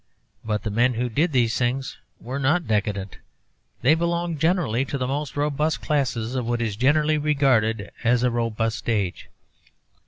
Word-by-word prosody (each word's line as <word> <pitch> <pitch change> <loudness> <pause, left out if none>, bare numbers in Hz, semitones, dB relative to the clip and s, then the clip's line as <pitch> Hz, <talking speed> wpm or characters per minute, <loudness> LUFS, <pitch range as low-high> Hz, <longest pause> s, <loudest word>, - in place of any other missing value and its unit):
But 105 -1 -2
the 110 - -3
men 120 +3 +2
who 125 +2 -1
did 155 +9 +1
these 120 -4 +2
things 130 +2 -2 0.2
were 130 +4 -5
not 155 +5 +2
decadent; 100 -3 -2 0.6
they 135 +5 +6
belonged 170 -1 -1
generally 160 - +1
to 140 - -3
the 130 - -1
most 140 +1 -3
robust 150 +2 0
classes 125 -6 -1
of 125 -3 -2
what 120 0 0
is 110 -4 -2
generally 150 +6 +2
regarded 130 -8 +1
as 120 +1 +3
a 125 - +2
robust 115 -1 -2
age. 100 -6 -1
125 Hz, 160 wpm, -24 LUFS, 115-150 Hz, 0.6 s, they